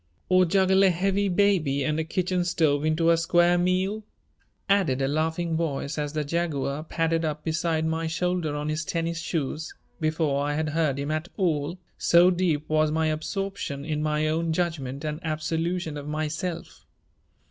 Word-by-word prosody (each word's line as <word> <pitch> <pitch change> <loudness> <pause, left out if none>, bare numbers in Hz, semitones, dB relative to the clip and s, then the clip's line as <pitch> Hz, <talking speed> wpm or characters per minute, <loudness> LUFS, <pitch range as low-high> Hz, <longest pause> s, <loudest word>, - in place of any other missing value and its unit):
"Or 185 0 +5
juggle 190 +2 +3
a 195 - +6
heavy 195 +3 +1
baby 175 -8 +2
and 155 +2 0
a - - +1
kitchen 180 +2 -1
stove 155 -4 +1
into 160 +2 +3
a 165 - +4
square 175 +1 +3
meal?" 185 +4 0 0.6
added 190 -10 +2
a 135 - +1
laughing 160 +3 -1
voice 145 -3 -2
as 145 0 -3
the 155 -1 -1
Jaguar 150 -2 -2
padded 165 0 0
up 150 -1 -3
beside 160 0 0
my 160 0 -1
shoulder 170 -2 -1
on 150 0 -3
his 155 +2 -1
tennis 165 +1 -2
shoes 160 -2 -3 0.2
before 155 -3 0
I 145 0 -1
had 155 0 -1
heard 150 -3 0
him 140 +2 -2
at 155 +3 -2
all, 170 -3 0 0.2
so 175 +2 +5
deep 170 -5 0
was 155 0 +2
my 160 +1 +1
absorption 155 -2 -3
in 150 -1 -2
my 155 0 0
own 160 +1 0
judgment 155 -5 -2
and 150 0 -3
absolution 160 0 -2
of 145 0 -7
myself. 155 +3 -4
160 Hz, 170 wpm, -26 LUFS, 150-175 Hz, 0.6 s, a